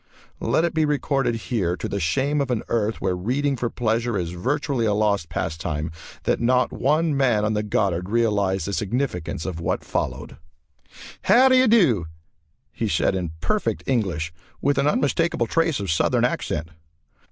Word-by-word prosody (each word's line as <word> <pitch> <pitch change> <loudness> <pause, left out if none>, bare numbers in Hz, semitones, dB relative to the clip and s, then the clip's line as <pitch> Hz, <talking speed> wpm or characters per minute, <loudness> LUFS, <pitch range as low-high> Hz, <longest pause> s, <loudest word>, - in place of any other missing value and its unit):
Let 165 - +1
it 170 - -2
be 160 -1 +2
recorded 140 -4 0
here, 105 -6 -1
to - - -4
the 100 - -3
shame 135 - +1
of 140 - -2
an 120 -3 -1
Earth 110 -1 0
where 95 -1 0
reading 135 +10 0
for 120 -1 -2
pleasure 115 -1 0
is 85 -2 -2
virtually 130 - -1
a 105 - +2
lost 100 -5 +1
pastime, 80 -1 -3 0.3
that - - +1
not 125 +2 +2
one 155 +2 +1
man 120 -6 +2
on 105 - 0
the 105 - 0
Goddard 95 -4 -1
realized 105 -4 +1
the 100 - -3
significance 105 - -2
of 90 -3 -4
what 85 - -2
followed. - - -3 0.9
"How 245 +7 +6
do 260 - +5
you 255 0 +5
do?" 150 - +4 0.6
he - - -2
said - - +2
in 90 -4 -3
perfect 215 -1 -1
English, 90 -10 -1 0.3
with 145 0 +1
an 140 - +2
unmistakable 150 -2 +1
trace 165 +1 +1
of 100 -4 -2
Southern 80 - +2
accent. 80 +2 -2
115 Hz, 170 wpm, -23 LUFS, 95-140 Hz, 0.9 s, How